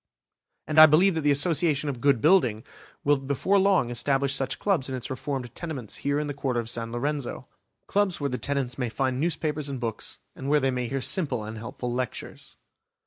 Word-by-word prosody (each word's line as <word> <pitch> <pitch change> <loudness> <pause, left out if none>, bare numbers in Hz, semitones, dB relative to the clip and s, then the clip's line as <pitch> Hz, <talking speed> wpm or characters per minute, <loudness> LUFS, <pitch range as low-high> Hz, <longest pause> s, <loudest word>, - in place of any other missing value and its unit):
And 155 0 +2
I 155 - +12
believe 175 +6 +4
that 160 - -1
the 145 - +2
Association 150 0 +2
of 130 -4 -4
Good 140 -4 +3
Building 130 - +3 0.4
will 145 0 +3
before 140 +9 +1
long 190 -11 +3
establish 135 +3 +1
such 135 -1 -1
clubs 175 -10 0
in 130 - -3
its 125 - -5
reformed 130 -2 -4
tenements 145 - -5
here 140 +1 -1
in 150 - -2
the 145 - -4
Quarter 135 -3 -1
of 115 0 -3
San 115 -1 -4
Lorenzo; 140 +2 -3 0.4
clubs 200 -3 0
where 145 - -1
the 125 - -3
tenants 135 -3 -2
may 125 -2 -1
find 130 +2 -1
newspapers 150 -2 -1
and 135 -2 -4
books, 115 -2 -4 0.2
and 135 - -5
where 150 +1 +4
they 135 -1 +1
may 125 -1 -2
hear 135 +2 -3
simple 140 - +1
and 110 +1 -7
helpful 120 +1 -5
lectures. 125 0 -5
140 Hz, 200 wpm, -26 LUFS, 125-150 Hz, 0.4 s, I